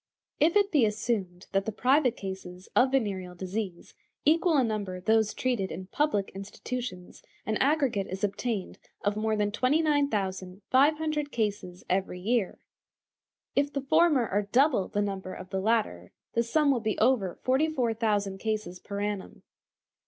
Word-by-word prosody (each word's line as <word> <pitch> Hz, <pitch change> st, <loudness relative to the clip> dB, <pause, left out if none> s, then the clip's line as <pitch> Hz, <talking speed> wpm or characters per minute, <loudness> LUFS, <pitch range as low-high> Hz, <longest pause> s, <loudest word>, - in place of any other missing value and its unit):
If 325 Hz, +5 st, +4 dB
it 405 Hz, -1 st, +4 dB
be 290 Hz, -6 st, +4 dB
assumed 205 Hz, -4 st, -1 dB
that 195 Hz, 0 st, +1 dB
the 220 Hz, -, -2 dB
private 255 Hz, +3 st, +2 dB
cases 190 Hz, -1 st, -7 dB
of 260 Hz, -, +5 dB
venereal 195 Hz, -9 st, -1 dB
disease 185 Hz, 0 st, -5 dB, 0.3 s
equal 325 Hz, +1 st, +4 dB
in 255 Hz, -4 st, +3 dB
number 200 Hz, -4 st, -3 dB
those 220 Hz, +3 st, +2 dB
treated 240 Hz, -7 st, -1 dB
in 185 Hz, +3 st, -6 dB
public 285 Hz, -10 st, 0 dB
institutions, 195 Hz, 0 st, -6 dB, 0.2 s
an 215 Hz, -1 st, 0 dB
aggregate 270 Hz, -9 st, +1 dB
is 190 Hz, +2 st, -6 dB
obtained 205 Hz, 0 st, -2 dB, 0.2 s
of 205 Hz, 0 st, +1 dB
more 215 Hz, 0 st, 0 dB
than 205 Hz, -1 st, 0 dB
29,500 280 Hz, -, +1 dB
cases 205 Hz, -5 st, -3 dB
every 185 Hz, -1 st, -1 dB
year. 220 Hz, +1 st, 0 dB, 1.0 s
If 285 Hz, +1 st, +2 dB
the 275 Hz, -, -2 dB
former 295 Hz, -3 st, +3 dB
are 205 Hz, +2 st, +1 dB
double 260 Hz, -6 st, +3 dB
the 205 Hz, -, -1 dB
number 190 Hz, -2 st, -4 dB
of 185 Hz, 0 st, -10 dB
the 190 Hz, -, -1 dB
latter, 205 Hz, -, 0 dB, 0.2 s
the 230 Hz, -, +2 dB
sum 285 Hz, +5 st, +2 dB
will 255 Hz, -, +1 dB
be 215 Hz, -2 st, -1 dB
over 220 Hz, -6 st, +2 dB
44,000 230 Hz, -8 st, +1 dB
cases 215 Hz, -4 st, -3 dB
per 200 Hz, +1 st, -5 dB
annum. 205 Hz, -2 st, -4 dB
215 Hz, 145 wpm, -28 LUFS, 195-265 Hz, 1.0 s, of